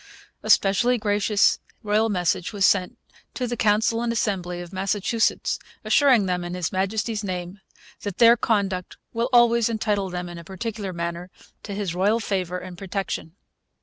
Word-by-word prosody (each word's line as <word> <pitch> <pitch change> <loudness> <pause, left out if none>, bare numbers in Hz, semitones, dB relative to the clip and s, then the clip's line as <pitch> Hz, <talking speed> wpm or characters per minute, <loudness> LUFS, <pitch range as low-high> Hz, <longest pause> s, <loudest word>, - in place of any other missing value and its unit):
A - - -7
specially 240 +6 +4
gracious 205 -1 +2 0.2
royal 215 +1 +2
message 180 -2 -1
was 200 -2 +2
sent 185 -3 +2 0.4
to 255 - -2
'The 240 0 -3
Council 220 +2 +2
and 240 -1 0
Assembly' 185 -6 -2
of 175 +1 -9
Massachusetts, 200 +4 0 0.3
assuring 260 -8 +4
them, 180 -1 -1
'in 175 +1 -5
His 180 -2 -2
Majesty's 210 +3 -1
name, 180 0 -5 0.4
that 205 -3 -5
their 235 0 +7
conduct 200 -6 -1 0.2
will 235 +2 -1
always 235 -2 +5
entitle 210 -3 -1
them, 180 0 -4
in 175 -1 -8
a - - -10
particular 200 +2 -5
manner, 170 +1 -4 0.3
to 200 - -6
his 200 -4 -2
Royal 200 +5 +2
favour 185 -5 -2
and 180 -1 -9
protection.' 190 -3 -4
200 Hz, 160 wpm, -24 LUFS, 180-220 Hz, 0.4 s, their